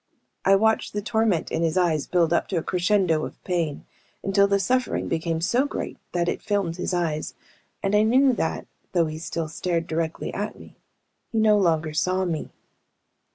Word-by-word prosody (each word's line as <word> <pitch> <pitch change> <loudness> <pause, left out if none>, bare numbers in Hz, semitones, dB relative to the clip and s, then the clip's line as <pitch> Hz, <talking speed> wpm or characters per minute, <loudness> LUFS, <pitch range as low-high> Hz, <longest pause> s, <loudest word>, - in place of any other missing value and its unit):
I 195 - +6
watched 220 +2 +2
the 205 - -2
torment 220 -6 +1
in 160 - -1
his 165 +1 +1
eyes 160 -5 +1
build 170 -2 +2
up - - +1
to 195 - -3
a 165 - -1
crescendo 180 -3 +2
of - - -6
pain, 170 -5 -2 0.4
until 200 +1 +3
the 200 0 +2
suffering 255 +5 0
became 165 0 -1
so 245 +10 +2
great - - -5
that 175 -1 0
it - - -1
filmed 195 -5 -1
his 180 - -2
eyes, 165 -4 -1 0.5
and 195 - 0
I 210 - +5
knew 255 +4 +4
that, - - -2 0.3
though 170 -2 +3
he 155 0 -5
still 165 0 -3
stared 165 +1 -2
directly 160 0 -3
at - - -4
me, - - -14 0.6
he 225 - -2
no 215 -1 +5
longer 160 -5 +1
saw 185 +4 +1
me. 165 -3 -3
180 Hz, 185 wpm, -24 LUFS, 165-205 Hz, 0.6 s, I